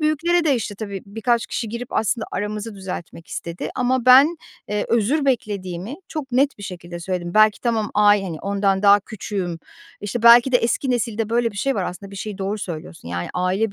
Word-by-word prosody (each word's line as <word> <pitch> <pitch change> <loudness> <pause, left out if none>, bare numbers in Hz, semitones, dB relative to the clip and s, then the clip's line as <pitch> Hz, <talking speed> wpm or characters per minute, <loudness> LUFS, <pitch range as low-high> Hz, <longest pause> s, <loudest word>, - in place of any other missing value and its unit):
büyüklere 330 +3 +2
de, 295 -4 +3
işte, 220 -4 -3
tabii, 200 -2 -6
birkaç 225 +3 0
kişi 225 - -3
girip 235 +2 -6
aslında 220 +1 0
aramızı 210 +2 -4
düzeltmek 180 -3 -7
istedi 170 +1 -5
ama 255 0 0
ben, 275 +7 +7 0.3
eee, 210 0 -1
özür 240 +7 +2
beklediğimi 205 -4 -2
çok 285 -5 -6
net 275 +1 +2
bir 205 - -10
şekilde 175 -2 -7
söyledim. 175 -1 -4
Belki 215 0 +5
tamam 225 -3 0
ay 205 -1 +5
hani, 170 -5 -5
ondan 195 -1 0
daha 205 0 +7
küçüğüm, 195 -5 -5 0.4
işte, 210 +3 -4
belki 235 +2 +7
de 245 - +7
eski 245 +3 0
nesilde 225 -3 -1
böyle 235 0 +2
bir 205 - -13
şey 270 +7 0
var 195 - -1
aslında, 195 +3 -7
bir 200 - -10
şeyi 210 +2 -5
Doğru 205 +2 -2
söylüyorsun 165 - -7
yani 85 0 -3
aile 190 +4 0
210 Hz, 190 wpm, -21 LUFS, 195-240 Hz, 0.4 s, ben